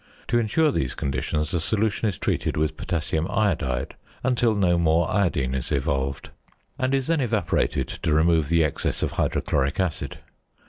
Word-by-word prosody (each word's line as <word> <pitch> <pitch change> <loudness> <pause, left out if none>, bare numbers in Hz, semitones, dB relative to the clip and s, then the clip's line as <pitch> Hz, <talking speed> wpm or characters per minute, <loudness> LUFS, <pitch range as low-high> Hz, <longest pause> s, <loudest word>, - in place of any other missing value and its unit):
To 120 - +3
ensure 145 +8 +2
these 65 - -2
conditions, 70 +3 -2
the 85 - 0
solution 110 +4 0
is 95 - -5
treated - - -1
with 80 0 0
potassium 80 -1 -2
iodide 75 -12 0 0.3
until 120 -3 +2
no 90 -4 +2
more 80 0 +3
iodine 85 -10 +1
is 65 -2 -3
evolved, 70 -1 -1 0.5
and 130 +1 +1
is 135 -1 0
then 165 -1 +1
evaporated 110 -7 0
to - - -3
remove 80 -1 +3
the 85 -1 +4
excess 75 - -1
of - - 0
hydrochloric 70 +2 0
acid. 90 -5 -2
85 Hz, 155 wpm, -24 LUFS, 75-110 Hz, 0.5 s, the